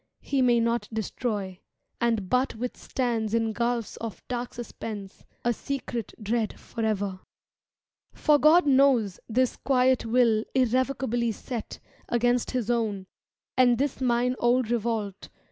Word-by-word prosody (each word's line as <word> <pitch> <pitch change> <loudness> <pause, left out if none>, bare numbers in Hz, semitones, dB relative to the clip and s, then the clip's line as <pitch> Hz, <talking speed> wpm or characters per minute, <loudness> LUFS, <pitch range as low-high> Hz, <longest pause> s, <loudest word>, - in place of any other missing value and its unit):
He 275 -2 0
may 240 -2 +4
not 230 +1 0
destroy, 210 -3 -3 0.4
And 225 -5 +1
but 250 +6 +1
withstands 235 -1 -2
in 225 -1 +1
gulfs 235 0 -1
of 220 -6 -7
dark 245 -1 -4
suspense, 215 -4 -7 0.2
A 240 - +3
secret 245 -3 -4
dread 220 0 -1
forever. 205 -4 -2 0.9
For 300 -1 +3
God 315 +4 +6
knows 260 -8 +4
This 255 +2 +1
quiet 260 -1 +2
will 225 -2 +3
irrevocably 255 -2 +1
set 230 +2 -6 0.3
Against 240 0 +2
His 245 -3 -1
own, 215 -5 -1 0.5
and 245 -2 +5
this 275 0 -1
mine 250 0 +2
old 240 -1 +2
revolt. 220 -4 -2
235 Hz, 125 wpm, -27 LUFS, 220-255 Hz, 0.9 s, God